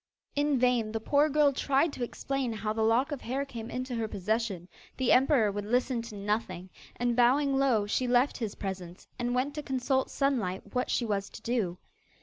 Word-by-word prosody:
In 290 Hz, -1 st, +2 dB
vain 245 Hz, -3 st, +2 dB
the 225 Hz, -, -1 dB
poor 285 Hz, +6 st, +3 dB
girl 295 Hz, -1 st, +4 dB
tried 280 Hz, +3 st, +1 dB
to 250 Hz, -, -4 dB
explain 270 Hz, +1 st, -2 dB
how 215 Hz, 0 st, -2 dB
the 220 Hz, -, -2 dB
lock 235 Hz, +7 st, +3 dB
of 285 Hz, -, -4 dB
hair 270 Hz, +4 st, -2 dB
came 235 Hz, -4 st, -7 dB
into 255 Hz, 0 st, -4 dB
her 230 Hz, -2 st, -1 dB
possession; 205 Hz, -2 st, -2 dB, 0.3 s
the 260 Hz, -2 st, +2 dB
emperor 255 Hz, -5 st, +4 dB
would 205 Hz, +1 st, -4 dB
listen 245 Hz, +1 st, +1 dB
to 230 Hz, -2 st, -9 dB
nothing, 200 Hz, -3 st, -3 dB, 0.2 s
and, 240 Hz, 0 st, 0 dB
bowing 270 Hz, +3 st, +4 dB
low, 260 Hz, -6 st, +3 dB
she 250 Hz, +5 st, 0 dB
left 245 Hz, +3 st, +3 dB
his 220 Hz, -4 st, -3 dB
presence 185 Hz, -2 st, -6 dB
and 245 Hz, 0 st, -1 dB
went 265 Hz, +3 st, 0 dB
to 300 Hz, -, -4 dB
consult 265 Hz, -1 st, 0 dB
Sunlight 205 Hz, -9 st, -1 dB
what 250 Hz, 0 st, 0 dB
she 240 Hz, -, +1 dB
was 200 Hz, -2 st, -2 dB
to -, -, -11 dB
do. 215 Hz, -8 st, -1 dB
245 Hz, 195 wpm, -29 LUFS, 215-270 Hz, 0.3 s, girl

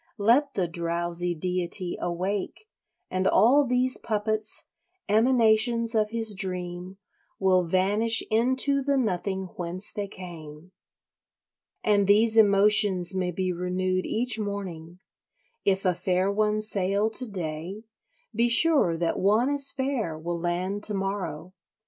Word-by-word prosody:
Let 245 Hz, +7 st, +2 dB
the 185 Hz, -3 st, 0 dB
drowsy 170 Hz, +1 st, -1 dB
deity 180 Hz, +2 st, -2 dB
awake 185 Hz, -, -3 dB, 0.5 s
and 185 Hz, +1 st, 0 dB
all 275 Hz, +5 st, +4 dB
these 250 Hz, +1 st, +1 dB
puppets, 215 Hz, 0 st, -1 dB, 0.4 s
emanations 230 Hz, +1 st, +2 dB
of 215 Hz, -1 st, +1 dB
his 225 Hz, -1 st, -3 dB
dream, 180 Hz, -1 st, -4 dB, 0.4 s
will 185 Hz, -2 st, +2 dB
vanish 205 Hz, +6 st, +2 dB
into 260 Hz, +5 st, +2 dB
the 280 Hz, +1 st, 0 dB
nothing 190 Hz, -4 st, -2 dB
whence 180 Hz, +2 st, -3 dB
they 205 Hz, -1 st, -4 dB
came. 170 Hz, -3 st, -11 dB, 1.1 s
And 205 Hz, -2 st, +2 dB
these 220 Hz, +2 st, +4 dB
emotions 200 Hz, -3 st, +4 dB
may 185 Hz, -1 st, -1 dB
be 185 Hz, +1 st, -2 dB
renewed 185 Hz, +1 st, -2 dB
each 245 Hz, 0 st, 0 dB
morning; 185 Hz, -5 st, -6 dB, 0.7 s
if 195 Hz, 0 st, +1 dB
a 180 Hz, -, +3 dB
fair 185 Hz, +2 st, 0 dB
one 215 Hz, +1 st, 0 dB
sail 200 Hz, +1 st, 0 dB
to 250 Hz, +1 st, -2 dB
day, 175 Hz, +2 st, -6 dB, 0.5 s
be 235 Hz, +2 st, +1 dB
sure 235 Hz, -, +4 dB
that 170 Hz, 0 st, -1 dB
one 215 Hz, +8 st, +2 dB
as 280 Hz, -1 st, +3 dB
fair 260 Hz, -, -3 dB
will 170 Hz, +2 st, -4 dB
land 180 Hz, +4 st, -3 dB
to 210 Hz, -, -1 dB
morrow. 190 Hz, -3 st, -4 dB
195 Hz, 125 wpm, -26 LUFS, 180-220 Hz, 1.1 s, all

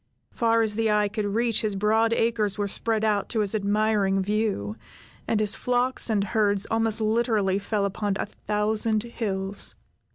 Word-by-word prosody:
Far 230 Hz, -1 st, +2 dB
as 215 Hz, -1 st, -1 dB
the 225 Hz, +1 st, 0 dB
eye 210 Hz, -1 st, +2 dB
could 210 Hz, 0 st, -2 dB
reach 230 Hz, +2 st, 0 dB
his 210 Hz, -2 st, -1 dB
broad 220 Hz, +3 st, +2 dB
acres 225 Hz, -3 st, 0 dB
were 205 Hz, -1 st, -1 dB
spread 220 Hz, +2 st, 0 dB
out 210 Hz, -2 st, +1 dB
to 220 Hz, -, 0 dB
his 205 Hz, 0 st, -1 dB
admiring 205 Hz, -1 st, +1 dB
view, 200 Hz, -, -1 dB, 0.5 s
and 220 Hz, -, +1 dB
his 210 Hz, -1 st, +2 dB
flocks 250 Hz, 0 st, 0 dB
and 210 Hz, -3 st, +1 dB
herds 205 Hz, 0 st, +1 dB
almost 225 Hz, 0 st, +1 dB
literally 215 Hz, -3 st, +1 dB
fed 205 Hz, 0 st, -1 dB
upon 200 Hz, 0 st, -1 dB
a -, -, -2 dB
thousand 215 Hz, +1 st, -1 dB
hills. 200 Hz, -4 st, -3 dB
215 Hz, 165 wpm, -25 LUFS, 200-225 Hz, 0.5 s, Far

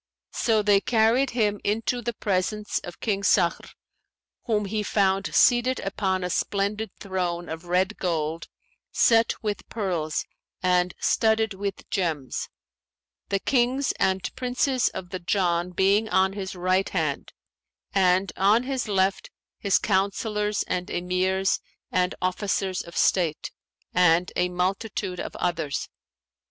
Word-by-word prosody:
So 220 Hz, -2 st, +2 dB
they 200 Hz, -1 st, +4 dB
carried 235 Hz, +4 st, +3 dB
him 210 Hz, -4 st, 0 dB
into 225 Hz, +4 st, 0 dB
the 235 Hz, 0 st, -3 dB
presence 205 Hz, +1 st, -1 dB
of 175 Hz, -, -10 dB
King 200 Hz, -3 st, 0 dB
Sakhr, 180 Hz, -3 st, +2 dB, 0.8 s
whom 210 Hz, -3 st, +1 dB
he 210 Hz, +2 st, -2 dB
found 195 Hz, -1 st, +1 dB
seated 250 Hz, +1 st, +4 dB
upon 190 Hz, -1 st, -1 dB
a 180 Hz, -, -2 dB
splendid 205 Hz, +3 st, -1 dB
throne 180 Hz, -3 st, -3 dB
of 160 Hz, +2 st, -7 dB
red 185 Hz, +4 st, +1 dB
gold, 165 Hz, -2 st, -2 dB, 0.4 s
set 230 Hz, 0 st, +4 dB
with 210 Hz, -1 st, -3 dB
pearls 175 Hz, -8 st, -2 dB, 0.4 s
and 180 Hz, 0 st, +2 dB
studded 220 Hz, -1 st, +2 dB
with 200 Hz, 0 st, -5 dB
gems; 160 Hz, -, -2 dB, 0.8 s
the 200 Hz, -, +2 dB
Kings 255 Hz, +5 st, +1 dB
and 190 Hz, 0 st, 0 dB
Princes 255 Hz, 0 st, +1 dB
of 180 Hz, -1 st, -8 dB
the 185 Hz, -, -4 dB
Jann 175 Hz, 0 st, 0 dB
being 195 Hz, +4 st, +2 dB
on 190 Hz, 0 st, +3 dB
his 195 Hz, -2 st, -5 dB
right 185 Hz, +2 st, +1 dB
hand, -, -, -2 dB, 0.6 s
and 190 Hz, 0 st, +3 dB
on 210 Hz, +5 st, +4 dB
his 260 Hz, -2 st, -2 dB
left 195 Hz, -1 st, 0 dB, 0.3 s
his 200 Hz, -, +3 dB
Councillors 210 Hz, +1 st, 0 dB
and 180 Hz, 0 st, -3 dB
Emirs 185 Hz, +2 st, 0 dB, 0.3 s
and 180 Hz, 0 st, +1 dB
Officers 190 Hz, 0 st, -1 dB
of 170 Hz, -, -10 dB
state, 170 Hz, -5 st, +1 dB, 0.4 s
and 180 Hz, 0 st, +4 dB
a 180 Hz, -, +1 dB
multitude 185 Hz, +1 st, -2 dB
of -, -, -5 dB
others. 165 Hz, -5 st, -2 dB
195 Hz, 130 wpm, -25 LUFS, 180-215 Hz, 0.8 s, they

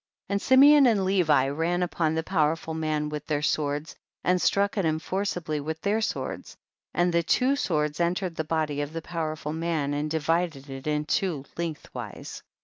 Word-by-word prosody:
63. -, -, +1 dB
And 200 Hz, -, 0 dB
Simeon 280 Hz, +1 st, +7 dB
and 205 Hz, -5 st, +2 dB
Levi 160 Hz, -8 st, +3 dB
ran 165 Hz, +5 st, 0 dB
up 175 Hz, -, -5 dB
on 160 Hz, -1 st, +2 dB
the 160 Hz, -, -1 dB
powerful 160 Hz, -2 st, 0 dB
man 155 Hz, -1 st, -1 dB
with 150 Hz, 0 st, -6 dB
their 150 Hz, -1 st, -1 dB
swords 150 Hz, +1 st, -1 dB, 0.3 s
and 180 Hz, 0 st, +2 dB
struck 200 Hz, 0 st, +2 dB
at 200 Hz, -, 0 dB
him 155 Hz, -1 st, +1 dB
forcibly 175 Hz, -2 st, -2 dB
with 160 Hz, +2 st, -4 dB
iheir 215 Hz, +2 st, +1 dB
swords, -, -, -4 dB, 0.3 s
and 175 Hz, 0 st, +1 dB
the 170 Hz, -, +3 dB
two 255 Hz, -, +2 dB
swords 150 Hz, -, -1 dB
entered 175 Hz, 0 st, 0 dB
the 160 Hz, -, -1 dB
body 155 Hz, -2 st, -1 dB
of 145 Hz, +1 st, -5 dB
the 165 Hz, -1 st, -5 dB
pow 170 Hz, -1 st, -4 dB
erful 150 Hz, -1 st, -5 dB
man 160 Hz, -4 st, -1 dB
and 145 Hz, +1 st, -2 dB
divided 160 Hz, -2 st, -1 dB
it 135 Hz, +1 st, -7 dB
in 150 Hz, 0 st, 0 dB
two, 155 Hz, -4 st, -1 dB
length 165 Hz, -3 st, -4 dB
wise. -, -, -7 dB
160 Hz, 195 wpm, -26 LUFS, 150-180 Hz, 0.3 s, Simeon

